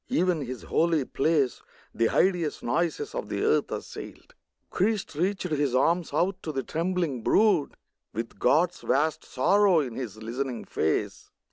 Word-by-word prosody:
(Even 180 - +1
His 130 -2 -6
holy 165 -4 +1
place 140 -2 +1 0.3
The 115 - +2
hideous 175 -5 +1
noises 175 - -1
of - - -4
the - - -2
earth - - +2
assailed.) - - -8 0.4
Christ 205 0 0
reached 185 +6 -1
His 145 -4 0
arms 170 +6 +2
out 180 +6 0
to 155 - -4
the 135 -2 -2
trembling 165 -4 -1
brood, 205 - +3 0.4
With 115 +2 -6
God's 165 +7 +2
vast 155 +3 +1
sorrow 195 +6 +3
in 130 -6 -2
His 115 -4 -6
listening 120 +3 -4
face. 80 - -2
155 Hz, 145 wpm, -27 LUFS, 130-180 Hz, 0.4 s, brood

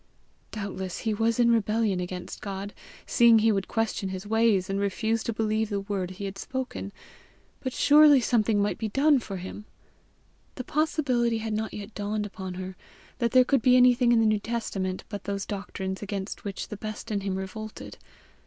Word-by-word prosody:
Doubtless 190 -3 -5
he 220 - 0
was 225 +2 +1
in 235 -1 +5
rebellion 215 -3 +1
against 180 0 -6
God, 200 0 -5 0.3
seeing 235 -1 +6
he 220 +1 +4
would 195 -2 -1
question 225 -4 -1
his 190 +1 -6
ways, 220 -3 +2
and 195 0 -1
refuse 220 +3 0
to - - 0
believe 220 0 0
the 200 -2 -1
word 195 -2 -3
he 185 +2 -7
had 195 0 -6
spoken, 260 -6 -4 0.7
but 260 - -3
surely 295 +1 +6
something 225 -3 +2
might 205 +1 0
be 220 - -2
done 280 +5 +4
for 195 -4 -6
him! 190 +3 -8 0.9
The 255 - -5
possibility 255 -6 +1
had 220 0 -3
not 220 +1 -2
yet 205 +1 -8
dawned 210 +1 -2
upon 190 -3 -7
her 185 0 -6 0.4
that 235 -2 +2
there 255 +1 +5
could 275 -1 +2
be 250 +2 +5
anything 245 -1 +5
in 235 - +5
the 225 - +3
New 215 -1 +3
Testament 200 -4 -3
but 205 -2 -7
those 200 -1 -3
doctrines 195 -1 -5
against 200 -1 -5
which 200 -2 -5
the 210 - -6
best 215 +2 -6
in 205 -1 0
him 195 -1 -2
revolted. 210 +3 -7
215 Hz, 185 wpm, -27 LUFS, 195-230 Hz, 0.9 s, seeing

